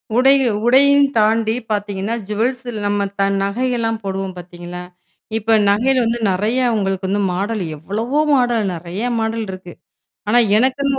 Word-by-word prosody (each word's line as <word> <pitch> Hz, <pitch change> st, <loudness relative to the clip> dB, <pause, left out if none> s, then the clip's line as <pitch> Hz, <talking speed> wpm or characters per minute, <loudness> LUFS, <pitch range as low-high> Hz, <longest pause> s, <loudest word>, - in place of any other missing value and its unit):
உடை 265 Hz, +3 st, +5 dB, 0.3 s
உடையம் 280 Hz, +3 st, +5 dB
தாண்டி 220 Hz, +1 st, +2 dB, 0.2 s
பார்த்தீங்கன்னா, 205 Hz, +1 st, -2 dB
ஜுவல்ஸ் 240 Hz, +5 st, -2 dB, 0.2 s
நம்ம 205 Hz, 0 st, 0 dB
த -, -, +3 dB, 0.2 s
நகைகள்ல்லாம் 225 Hz, +1 st, -1 dB
போடுவோம் 195 Hz, -1 st, -4 dB
பார்த்தீங்களா? 175 Hz, 0 st, -9 dB, 0.5 s
இப்ப 225 Hz, +1 st, +2 dB
நகையில 250 Hz, +5 st, +2 dB
வந்து 230 Hz, +1 st, -1 dB
நறைய 210 Hz, +7 st, 0 dB, 0.2 s
உங்களுக்கு 195 Hz, -2 st, -1 dB
வந்து 200 Hz, +2 st, 0 dB
மாடல் 200 Hz, +3 st, -2 dB
எவ்வளவோ 225 Hz, -, -2 dB, 0.2 s
மாடல் 240 Hz, -5 st, +1 dB
நறைய 175 Hz, +4 st, -6 dB, 0.2 s
மாடல் 225 Hz, 0 st, -2 dB
இருக்கு. 185 Hz, -2 st, -10 dB, 0.6 s
ஆனா, 235 Hz, +3 st, +4 dB, 0.2 s
எனக்குன்னு 270 Hz, +3 st, +1 dB
215 Hz, 130 wpm, -18 LUFS, 195-245 Hz, 0.6 s, உடை